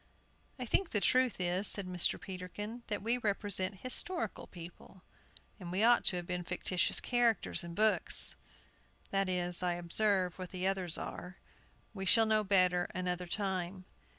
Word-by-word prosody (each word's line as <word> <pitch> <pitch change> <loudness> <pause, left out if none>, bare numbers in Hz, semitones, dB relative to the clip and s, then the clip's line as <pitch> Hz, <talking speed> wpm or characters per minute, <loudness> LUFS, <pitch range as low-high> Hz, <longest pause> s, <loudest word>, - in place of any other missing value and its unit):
"I 250 - -5
think 350 - 0
the 210 - +2
truth 255 +2 +2
is," 180 +3 +2
said 200 - +2
Mr. 180 -1 +1
Peterkin, 200 +5 -7
"that 205 -3 -3
we 235 +3 +1
represent 200 -3 -2
historical 345 +8 -2
people, 175 +1 -12 0.6
and 175 -3 -7
we 190 +4 0
ought 240 +1 +5
to - - +2
have 175 -1 -4
been 180 0 -3
fictitious 180 0 +1
characters 240 -6 +2
in 170 -1 -8
books. 215 +2 +3 0.8
That 195 -1 +1
is, 180 -1 0
I 180 -1 0
observe, 180 +1 0
what 185 -1 -6
the 185 0 -4
others 190 -3 0
are. 180 +1 -7 0.6
We 195 -2 -5
shall 225 +2 +5
know 215 -1 +2
better 185 -3 +3
another 180 0 -2
time." 185 -1 -3
190 Hz, 155 wpm, -33 LUFS, 180-215 Hz, 0.8 s, ought